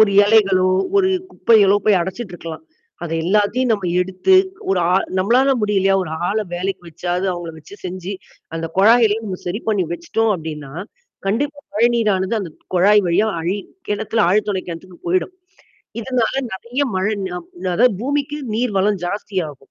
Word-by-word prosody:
ஒரு 215 Hz, -2 st, +6 dB
இலைகளோ, 195 Hz, -4 st, +4 dB, 0.3 s
ஒரு 380 Hz, -1 st, +4 dB, 0.2 s
குப்பைகளோ 205 Hz, -, +4 dB
போய் 205 Hz, -4 st, +4 dB
அடைச்சுட்டு 190 Hz, +3 st, -5 dB
இருக்கலாம். 165 Hz, -, -8 dB, 0.4 s
அத 165 Hz, -, -5 dB
எல்லாத்தையும் 210 Hz, +6 st, +2 dB
நம்ம 200 Hz, -4 st, -1 dB, 0.2 s
எடுத்து 185 Hz, -, +2 dB, 0.4 s
ஒரு 190 Hz, -, +2 dB
ஆ -, -, +4 dB, 0.2 s
நம்மளால 245 Hz, +8 st, +3 dB
முடியலையா? 195 Hz, -2 st, +2 dB
ஒரு 160 Hz, -, -6 dB, 0.2 s
ஆள 215 Hz, -, 0 dB, 0.2 s
வேலைக்கு 190 Hz, +1 st, -3 dB
வச்சாவது 180 Hz, +3 st, -2 dB
அவங்கள 175 Hz, -2 st, -6 dB
வச்சு 160 Hz, +6 st, -13 dB
செஞ்சு, 185 Hz, +1 st, -5 dB, 0.4 s
அந்த 165 Hz, 0 st, -3 dB
குழாயெல்லாம் 225 Hz, +1 st, +5 dB
நம்ம 185 Hz, -2 st, -4 dB
சரி 195 Hz, +6 st, -2 dB
பண்ணி 200 Hz, -4 st, +2 dB
வச்சுட்டோம் 215 Hz, +6 st, -1 dB
அப்டின்னா, 150 Hz, -4 st, -7 dB, 0.5 s
கண்டிப்பா 285 Hz, +8 st, -1 dB
மழைநீரானது 220 Hz, -3 st, +2 dB
அந்த 180 Hz, -, -6 dB, 0.2 s
குழாய் 205 Hz, +4 st, +5 dB
வழியா 175 Hz, +6 st, +2 dB
அழி 180 Hz, +5 st, -1 dB, 0.3 s
கிணத்தில 215 Hz, +2 st, -1 dB
ஆழ் 205 Hz, +4 st, +3 dB
துளை 190 Hz, -2 st, -1 dB
கிணத்துக்கு 175 Hz, +1 st, -9 dB
போயிடும். 185 Hz, -, 0 dB, 0.7 s
இதனால 245 Hz, 0 st, 0 dB, 0.2 s
நெறைய 235 Hz, +8 st, -4 dB
மழை 190 Hz, +3 st, 0 dB
நா 180 Hz, -, -5 dB, 0.4 s
அதாவது 245 Hz, +4 st, +4 dB
பூமிக்கு 285 Hz, +3 st, -1 dB, 0.2 s
நீர் 240 Hz, 0 st, 0 dB
வளம் 200 Hz, 0 st, +2 dB
ஜாஸ்தியாகும். 175 Hz, -8 st, -4 dB
200 Hz, 150 wpm, -19 LUFS, 180-225 Hz, 0.7 s, ஒரு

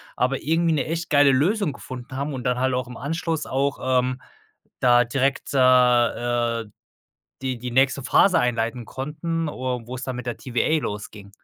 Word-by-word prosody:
aber 130 Hz, +2 st, 0 dB
irgendwie 165 Hz, +2 st, +2 dB
'ne 145 Hz, -, 0 dB
echt 170 Hz, +2 st, -3 dB
geile 145 Hz, -2 st, +5 dB
Lösung 165 Hz, +4 st, +1 dB
gefunden 130 Hz, +1 st, -9 dB
haben 140 Hz, +2 st, -3 dB
und 125 Hz, -2 st, -5 dB
dann 125 Hz, 0 st, +1 dB
halt 130 Hz, 0 st, +1 dB
auch 125 Hz, -1 st, -2 dB
im 125 Hz, -, -9 dB
Anschluss 160 Hz, +3 st, -2 dB
auch, 140 Hz, +1 st, -1 dB, 0.2 s
ähm, 125 Hz, 0 st, -2 dB, 0.6 s
da 120 Hz, -1 st, +5 dB
direkt, 135 Hz, +4 st, -1 dB
äh 135 Hz, -, +2 dB
äh, 120 Hz, -2 st, +3 dB, 0.8 s
die 130 Hz, -2 st, -2 dB
die 125 Hz, +1 st, -5 dB
nächste 135 Hz, +2 st, +2 dB
Phase 165 Hz, +6 st, +4 dB
einleiten 120 Hz, 0 st, -1 dB
konnten, 155 Hz, +4 st, -3 dB
or 125 Hz, -4 st, -4 dB
wo 125 Hz, -, -7 dB
es 125 Hz, -, -8 dB
dann 130 Hz, -1 st, -4 dB
mit 125 Hz, 0 st, -7 dB
der 120 Hz, -, -3 dB
TVA 130 Hz, +5 st, 0 dB
losging. 105 Hz, -1 st, -6 dB
130 Hz, 180 wpm, -23 LUFS, 125-145 Hz, 0.8 s, geile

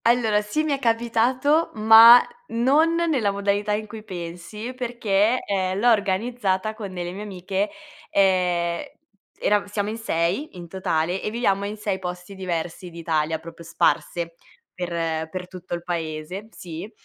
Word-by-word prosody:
Allora, 230 Hz, -3 st, +3 dB
sì 210 Hz, +9 st, -1 dB
mi 310 Hz, -, -1 dB
è 280 Hz, -, 0 dB
capitato, 245 Hz, +6 st, +2 dB
ma 225 Hz, +2 st, +9 dB, 0.3 s
non 285 Hz, +8 st, +3 dB
nella 315 Hz, -11 st, +1 dB
modalità 200 Hz, +1 st, 0 dB
in 215 Hz, +1 st, -2 dB
cui 215 Hz, 0 st, -9 dB
pensi, 185 Hz, +5 st, -7 dB
perché, 235 Hz, -3 st, +1 dB
eh, 190 Hz, -2 st, 0 dB
l'ho 235 Hz, +5 st, +4 dB
organizzata 205 Hz, 0 st, 0 dB
con 210 Hz, -3 st, -7 dB
delle 175 Hz, -1 st, -4 dB
mie 195 Hz, +3 st, -7 dB
amiche, 195 Hz, 0 st, -2 dB, 0.4 s
ehm, 180 Hz, -3 st, +2 dB, 0.6 s
erav 210 Hz, 0 st, +1 dB
siamo 205 Hz, 0 st, -2 dB
in 220 Hz, -, -4 dB
6 185 Hz, -, -1 dB
in 175 Hz, -1 st, -8 dB
totale 175 Hz, 0 st, -1 dB
e -, -, -2 dB
viviamo 200 Hz, -3 st, 0 dB
in 210 Hz, +1 st, -5 dB
6 205 Hz, -2 st, -2 dB
posti 180 Hz, +1 st, -6 dB
diversi 175 Hz, -1 st, -4 dB
d'Italia, 160 Hz, -2 st, -1 dB
proprio 165 Hz, +1 st, -11 dB
sparse 170 Hz, 0 st, 0 dB, 0.4 s
per 165 Hz, -3 st, -2 dB
per 180 Hz, +2 st, -6 dB
tutto 180 Hz, -1 st, -6 dB
il 170 Hz, -, -7 dB
paese. 170 Hz, +3 st, -4 dB
Sì. 175 Hz, 0 st, -8 dB
195 Hz, 150 wpm, -24 LUFS, 175-225 Hz, 0.6 s, ma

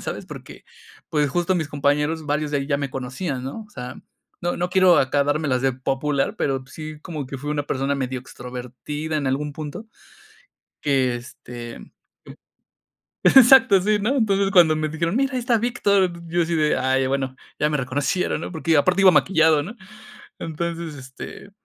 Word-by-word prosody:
¿sabes? -, -, -5 dB
Porque, -, -, -11 dB, 0.4 s
pues, 150 Hz, -3 st, +1 dB
justo 175 Hz, +5 st, 0 dB
mis 160 Hz, -, -1 dB
compañeros, 150 Hz, +2 st, 0 dB
varios 150 Hz, 0 st, -1 dB
de 145 Hz, -, +2 dB
ahí 140 Hz, -, -3 dB
ya 140 Hz, -, +2 dB
me 140 Hz, -2 st, -3 dB
conocían, 130 Hz, +2 st, -4 dB
¿no? 140 Hz, +12 st, -6 dB
O 210 Hz, -, -27 dB
sea, 125 Hz, -5 st, -7 dB, 0.4 s
no 175 Hz, +1 st, -1 dB
no 180 Hz, +1 st, -2 dB
quiero 185 Hz, -4 st, +5 dB
acá 140 Hz, +2 st, +2 dB
dármelas 145 Hz, -3 st, 0 dB
de 135 Hz, -, +2 dB
popular, 135 Hz, +2 st, -1 dB
pero 135 Hz, -2 st, -1 dB
sí 155 Hz, +1 st, -8 dB
como 155 Hz, -7 st, -5 dB
que 135 Hz, 0 st, -7 dB
fui 145 Hz, +3 st, -5 dB
una 145 Hz, -1 st, -1 dB
persona 140 Hz, 0 st, -1 dB
medio 130 Hz, -1 st, -3 dB
extrovertida 125 Hz, +5 st, -6 dB
en 145 Hz, -3 st, -2 dB
algún 145 Hz, +3 st, -1 dB
punto. 155 Hz, +9 st, -7 dB, 1.0 s
Que, 130 Hz, -4 st, +1 dB
este, 120 Hz, -1 st, -9 dB
jum, -, -, -14 dB, 1.3 s
exacto 260 Hz, -5 st, +7 dB
sí, 210 Hz, +2 st, +2 dB
¿no? 235 Hz, +8 st, 0 dB
Entonces, 200 Hz, -4 st, +2 dB
cuando 170 Hz, -4 st, +6 dB
me 155 Hz, 0 st, -1 dB
dijeron: 165 Hz, +5 st, -2 dB
"Mira, 275 Hz, +1 st, +1 dB
ahí 255 Hz, -, 0 dB
está 240 Hz, -1 st, +2 dB
Víctor", 200 Hz, -5 st, +2 dB, 0.2 s
yo 170 Hz, +1 st, 0 dB
así 170 Hz, 0 st, -1 dB
de: 150 Hz, -1 st, +2 dB
"Ay, 130 Hz, 0 st, +1 dB
bueno, 135 Hz, -1 st, -2 dB, 0.2 s
ya 150 Hz, -, +2 dB
me 150 Hz, -, 0 dB
reconocieron", 140 Hz, +7 st, -1 dB
¿no? -, -, -6 dB
Porque 165 Hz, -1 st, 0 dB
aparte 185 Hz, +6 st, +3 dB
iba 190 Hz, -, +8 dB
maquillado, 160 Hz, -5 st, +4 dB
¿no? 210 Hz, +10 st, -8 dB, 0.6 s
Entonces, 165 Hz, -1 st, -4 dB
este, 130 Hz, +9 st, -10 dB
150 Hz, 175 wpm, -22 LUFS, 135-175 Hz, 1.3 s, iba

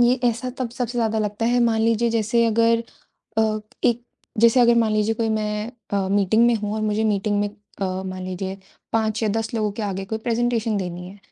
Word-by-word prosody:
ये 240 Hz, +1 st, +5 dB
ऐसा 240 Hz, +2 st, 0 dB
तब 250 Hz, -3 st, -2 dB
सबसे 245 Hz, -1 st, -3 dB
ज़्यादा 220 Hz, -1 st, +1 dB
लगता 210 Hz, +1 st, -2 dB
है, 245 Hz, +1 st, +3 dB
मान 230 Hz, -2 st, +2 dB
लीजिए 230 Hz, +1 st, +2 dB
जैसे 230 Hz, +1 st, +2 dB
अगर 230 Hz, +1 st, +3 dB, 0.6 s
अ, 220 Hz, -1 st, +2 dB, 0.3 s
एक 240 Hz, 0 st, +2 dB, 0.4 s
जैसे 235 Hz, +2 st, +6 dB
अगर 235 Hz, 0 st, +6 dB
मान 220 Hz, -2 st, +2 dB
लीजिए 215 Hz, +1 st, +1 dB
कोई 225 Hz, 0 st, -1 dB
मैं 215 Hz, +1 st, -1 dB, 0.2 s
अ, 195 Hz, -1 st, +1 dB
मीटिंग 205 Hz, +4 st, +3 dB
में 240 Hz, -, +4 dB
हूँ 210 Hz, -1 st, -2 dB
और 220 Hz, -, -2 dB
मुझे 215 Hz, +1 st, 0 dB
मीटिंग 205 Hz, 0 st, +1 dB
में 205 Hz, -, 0 dB
अ, 205 Hz, -1 st, -9 dB, 0.2 s
मान 185 Hz, 0 st, -5 dB
लीजिए 190 Hz, +1 st, -4 dB, 0.4 s
5 220 Hz, 0 st, 0 dB
या 220 Hz, -, +2 dB
10 225 Hz, +1 st, -2 dB
लोगों 215 Hz, -2 st, 0 dB
के 215 Hz, -, -5 dB
आगे 195 Hz, -1 st, -3 dB
कोई 220 Hz, +3 st, -3 dB
प्रेज़ेन्टेशन 230 Hz, -1 st, 0 dB
देनी 180 Hz, -1 st, -4 dB
है। 200 Hz, +2 st, -13 dB
220 Hz, 210 wpm, -23 LUFS, 205-230 Hz, 0.6 s, जैसे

